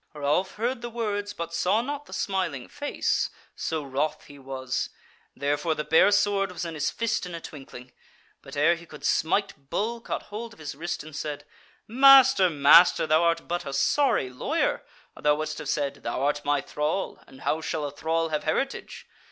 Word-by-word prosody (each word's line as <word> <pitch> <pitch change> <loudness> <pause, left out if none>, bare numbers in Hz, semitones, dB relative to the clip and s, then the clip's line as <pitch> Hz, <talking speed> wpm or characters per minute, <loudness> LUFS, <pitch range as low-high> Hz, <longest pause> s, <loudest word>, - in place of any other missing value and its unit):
Ralph 150 +6 0
heard 235 +3 -2
the 240 - -5
words 205 -3 -2
but 170 -2 -6
saw 200 +7 +2
not 290 +2 -5
the - - -14
smiling 185 -10 -2
face, 290 0 -1 0.3
so 160 -2 -3
wroth 145 +3 -2
he 145 -1 -14
was; 130 -1 -3 0.5
therefore 145 +3 0
the 150 - -2
bare 160 +6 +5
sword 200 -1 +2
was 180 -1 -5
in 165 - -5
his 150 - -1
fist 225 -5 -2
in 175 - -6
a - - -5
twinkling. 135 -5 -11 0.5
But - - -10
ere 150 +4 +5
he 170 0 -9
could 150 - -10
smite 160 -4 0
Bull 230 +3 -2
caught - - -4
hold 225 +2 -7
of - - -19
his 150 -2 -6
wrist, 165 +4 -4
and 155 -1 -11
said: 145 -1 -5 0.4
"Master, 265 -4 +7
master, 155 +4 +6
thou 155 +1 +3
art 170 -1 +1
but 175 0 -2
a 140 - -6
sorry 135 - +2
lawyer, 125 - -1 0.3
or - - -13
thou 150 0 +4
wouldst 155 0 -4
have - - -5
said: 140 -2 -1
'Thou - - -3
art 145 +1 0
my 145 -1 +1
thrall, 150 +7 -2
and 130 - -15
how 160 - 0
shall 155 -1 -2
a 145 - -4
thrall 165 +2 -1
have 150 -1 -2
heritage?' 270 +13 -2
160 Hz, 195 wpm, -26 LUFS, 145-205 Hz, 0.5 s, Master